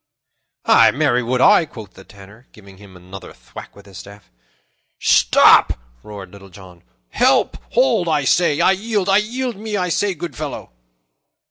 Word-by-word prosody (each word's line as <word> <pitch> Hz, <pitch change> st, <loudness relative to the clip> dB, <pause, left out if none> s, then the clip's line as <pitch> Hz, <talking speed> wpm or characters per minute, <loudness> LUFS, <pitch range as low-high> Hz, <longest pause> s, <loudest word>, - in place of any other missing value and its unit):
"Ay, -, -, +5 dB
marry 125 Hz, +1 st, 0 dB
would 125 Hz, +1 st, -2 dB
I," 205 Hz, +1 st, +5 dB
quoth 110 Hz, -7 st, -13 dB
the 95 Hz, -, -16 dB
Tanner, 100 Hz, +5 st, -18 dB
giving 100 Hz, -3 st, -17 dB
him 95 Hz, -2 st, -16 dB
another 95 Hz, +2 st, -13 dB
thwack -, -, -14 dB
with 100 Hz, -, -17 dB
his 95 Hz, -3 st, -13 dB
staff. 100 Hz, +1 st, -15 dB, 0.7 s
"Stop!" -, -, +4 dB, 0.3 s
roared 100 Hz, -3 st, -11 dB
Little 100 Hz, -1 st, -15 dB
John. 90 Hz, -2 st, -16 dB, 0.3 s
"Help! -, -, +1 dB, 0.2 s
Hold, 150 Hz, +7 st, +1 dB
I 150 Hz, -3 st, 0 dB
say! 150 Hz, +1 st, +1 dB
I -, -, +3 dB
yield 205 Hz, 0 st, -3 dB
me! 195 Hz, -, +1 dB
I -, -, +5 dB
yield 240 Hz, +2 st, -4 dB
me, 210 Hz, 0 st, -5 dB
I 180 Hz, -2 st, -2 dB
say, 195 Hz, +3 st, -2 dB
good 170 Hz, +2 st, -8 dB
fellow!" 150 Hz, -, -8 dB
125 Hz, 165 wpm, -18 LUFS, -, 0.7 s, Ay